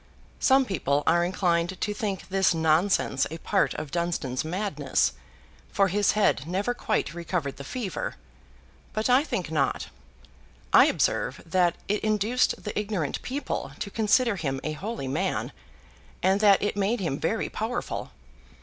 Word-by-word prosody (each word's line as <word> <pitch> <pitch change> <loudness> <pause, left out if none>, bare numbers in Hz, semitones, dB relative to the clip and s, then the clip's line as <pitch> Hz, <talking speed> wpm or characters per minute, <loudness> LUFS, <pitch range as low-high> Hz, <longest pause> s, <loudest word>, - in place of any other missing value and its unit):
Some 265 0 +4
people 145 - 0
are 170 +1 +4
inclined 175 0 0
to 210 - -1
think 205 -3 -4
this 190 -2 +3
nonsense 160 -3 +2
a 160 - -6
part - - +1
of 145 - -5
Dunstan's 170 -7 -1
madness 160 -5 0 0.6
(for 195 -1 +3
his 205 +3 +2
head 200 -9 +2
never 195 +7 0
quite 215 -8 -1
recovered 170 -4 -3
the 140 - -7
fever), 210 - -4 0.8
but 215 +3 0
I 260 +3 +5
think 200 - -3
not. 140 -4 0 0.8
I - - +8
observe - - 0
that 175 0 +2
it 210 +1 -1
induced 215 +3 +1
the 210 - -4
ignorant 200 -8 -2
people 275 +3 -4
to 200 - -5
consider 225 +1 +2
him 135 -5 -2
a 155 - -2
holy 195 - -5
man, 145 -4 -1 0.7
and 190 +2 +3
that 205 -2 +5
it 205 - 0
made 205 +4 0
him 165 -8 -2
very - - 0
powerful. - - -3
190 Hz, 150 wpm, -26 LUFS, 160-210 Hz, 0.8 s, I